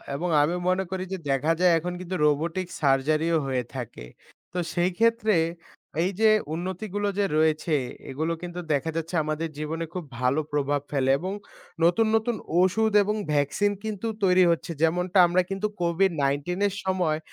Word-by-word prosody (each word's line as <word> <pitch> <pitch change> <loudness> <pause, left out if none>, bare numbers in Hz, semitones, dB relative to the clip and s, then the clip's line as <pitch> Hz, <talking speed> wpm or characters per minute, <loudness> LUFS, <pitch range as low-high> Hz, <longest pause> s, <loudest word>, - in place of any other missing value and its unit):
এবং 175 +5 -2
আমি 155 +4 +1
মনে 185 +1 +1
করি 190 -1 -2
যে - - -2
দেখা 135 +4 +1
যায় 180 -1 +5
এখন 175 +2 -3
কিন্তু 185 0 -5
'রোবটিক 165 +5 0
সার্জারিও' 155 +4 +2
হয়ে 130 -2 -1
থাকে। 120 - -6 0.5
তো - - -4 0.2
সেই 175 +1 +2
ক্ষেত্রে 230 -1 +3 0.7
এই 185 - 0
যে 220 - +6 0.3
উন্নতিগুলো 190 +4 -3
যে 200 - +3
রয়েছে 155 0 +2 0.3
এগুলো 160 +5 -2
কিন্তু 175 0 -6
দেখা 145 +3 0
যাচ্ছে 165 +2 -3
আমাদের 155 +2 -2
জীবনে 160 +2 -3
খুব 180 - -4 0.2
ভালো 130 +4 +2
প্রভাব 145 -1 0
ফেলে 135 -2 +1
এবং 185 +4 -3 0.5
নতুন, 200 +7 +4
নতুন 225 +1 +1 0.3
ওষুধ 220 +4 +2
এবং 210 +2 -1 0.2
ভ্যাকসিন 145 +8 +1
কিন্তু 220 0 -4 0.2
তৈরি 185 -1 +5
হচ্ছে। 170 0 -2
যেমনটা 180 +3 +1
আমরা 175 +2 +3
কিন্তু 195 +2 -1
'COVID-19' 170 -2 0
এর 200 - -4
সময় 180 -5 0
170 Hz, 160 wpm, -26 LUFS, 150-190 Hz, 0.7 s, যে